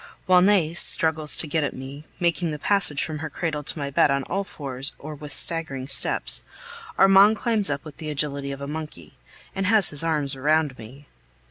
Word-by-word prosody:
While 185 -1 +4
Nais 180 -4 +3
struggles 155 -3 +4
to - - -1
get 155 0 -1
at 145 - -3
me, 135 +3 -10
making 170 -1 0
the 150 - -5
passage 175 -3 +2
from 155 -2 -5
her 160 +1 -5
cradle 155 0 -4
to 145 - -3
my 140 -1 -4
bed 140 - +3
on 140 0 0
all 195 +8 -3
fours 135 -6 0
or 155 +2 -9
with 150 0 -10
staggering 140 -5 -2
steps, 135 - -1 0.5
Armand 195 +2 +6
climbs 220 -5 +1
up 140 0 -4
with 155 -3 -11
the 155 - -7
agility 140 -1 -3
of 140 0 -8
a 140 - -6
monkey, 150 - -8 0.4
and 195 0 -2
has 210 -3 +5
his 150 +1 0
arms 150 -4 -1
round 150 +1 0
me. 130 +6 -13
150 Hz, 200 wpm, -23 LUFS, 140-170 Hz, 0.5 s, Armand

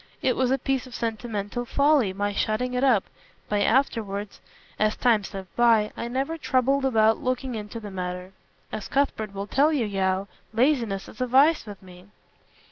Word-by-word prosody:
It 255 - +2
was 255 -1 +1
a 265 - +2
piece 270 0 -1
of 250 - -10
sentimental 225 0 -3
folly 280 -4 +3
my 205 +2 -2
shutting 235 +5 -1
it 250 +1 0
up, 240 -8 +4 0.4
but 205 -1 0
afterwards, 215 -5 0 0.4
as 215 0 +2
time 230 -4 +3
slipped 190 -2 -8
by, 230 -3 +4
I 235 - -4
never 270 +7 -2
troubled 270 0 +1
about 220 -3 +3
looking 255 0 -2
into 215 +1 -6
the 210 -2 -8
matter. 180 0 -5 0.4
As 215 - -5
Cuthbert 270 -7 0
will 200 +1 -3
tell 280 +8 +3
you, 275 -7 +1
Yeo, 195 -1 0 0.3
laziness 230 -6 +1
is 215 - -11
a 255 - +1
vice 275 +3 +4
with 205 -2 -10
me." 180 0 -14
230 Hz, 175 wpm, -25 LUFS, 205-260 Hz, 0.4 s, up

